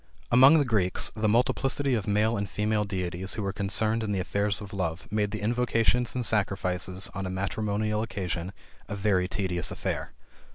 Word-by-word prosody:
Among 135 +6 +8
the 145 - +3
Greeks, 100 -7 +1
the 110 -1 0
multiplicity 130 +4 +1
of 110 -4 -1
male 105 +2 +2
and 100 -2 -3
female 105 0 0
deities 95 -1 -3
who 110 - -3
were 95 -1 -2
concerned 110 +3 0
in 110 -2 -2
the 100 - 0
affairs 100 +2 0
of 100 -2 -9
love, 90 -3 -3
made 105 -1 +1
the 105 0 -5
invocations 120 +1 +1
and 125 -1 -1
sacrifices 95 -3 0
on 95 -1 -4
a - - -4
matrimonial 105 +3 -1
occasion 90 -5 -3 0.4
a 105 - -4
very 95 -3 +1
tedious 90 -2 -2
affair. - - -3
105 Hz, 175 wpm, -27 LUFS, 95-110 Hz, 0.4 s, Among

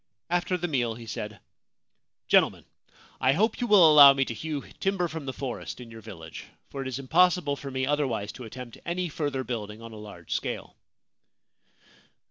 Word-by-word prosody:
After 175 +1 +1
the 175 0 -2
meal 120 -7 0
he 115 0 -10
said: 105 -1 -6 0.5
' - - -55
Gentlemen, - - +3 0.5
I 130 +2 +3
hope 215 - +1
you 240 - 0
will 200 -6 +8
allow 145 -3 +10
me 135 -1 +1
to 115 - -4
hew 145 +4 -4 0.2
timber 195 -2 0
from 155 -3 -7
the - - -1
forest 130 -2 -6
in 120 -2 -10
your 115 0 -10
village, 85 -7 -10 0.3
for 135 - -5
it 135 - -4
is 130 - -3
impossible 160 +2 +3
for 140 0 -7
me 130 0 -1
otherwise 130 -8 -1
to 125 - -10
attempt 120 +1 -9
any 175 +1 -2
further 145 -4 -2
building 110 -3 -5
on 115 0 -10
a 110 - -10
large 100 -6 -11
scale.' - - -4
135 Hz, 185 wpm, -27 LUFS, 115-160 Hz, 0.5 s, allow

